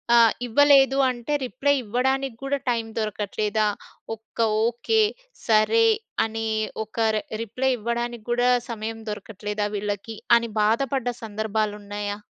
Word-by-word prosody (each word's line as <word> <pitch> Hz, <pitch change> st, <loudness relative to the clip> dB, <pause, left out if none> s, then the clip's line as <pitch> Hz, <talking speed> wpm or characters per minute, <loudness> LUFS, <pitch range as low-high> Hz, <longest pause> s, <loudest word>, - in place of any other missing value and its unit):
ఆహ్, 230 Hz, -2 st, +6 dB
ఇవ్వలేదు 275 Hz, +1 st, +5 dB
అంటే, 240 Hz, +4 st, -4 dB
రిప్లై 275 Hz, +3 st, +1 dB
ఇవ్వడానికి 260 Hz, +3 st, 0 dB
గూడా 275 Hz, +1 st, -1 dB
టైం 230 Hz, -2 st, 0 dB
దొరకట్లేదా? 215 Hz, 0 st, -1 dB, 0.5 s
ఒక్క 225 Hz, +2 st, -30 dB, 0.3 s
ఓకే, 240 Hz, -, +2 dB, 0.4 s
సరే, 230 Hz, -, +4 dB, 0.4 s
అని 225 Hz, 0 st, -3 dB, 0.4 s
ఒక 220 Hz, -, -18 dB, 0.2 s
రె 215 Hz, -, 0 dB, 0.2 s
రిప్లై 255 Hz, +4 st, -1 dB
ఇవ్వడానికి 235 Hz, 0 st, -3 dB
కూడా, 245 Hz, +1 st, +3 dB, 0.2 s
సమయం 225 Hz, 0 st, -4 dB
దొరకట్లేదా 210 Hz, 0 st, -4 dB
వీళ్ళకి? 205 Hz, +2 st, -4 dB, 0.2 s
అని 235 Hz, -1 st, -3 dB
బాధపడ్డ 245 Hz, +4 st, +1 dB, 0.2 s
సందర్భాలున్నయ్యా? 210 Hz, -1 st, -3 dB
225 Hz, 110 wpm, -24 LUFS, 210-250 Hz, 0.5 s, ఆహ్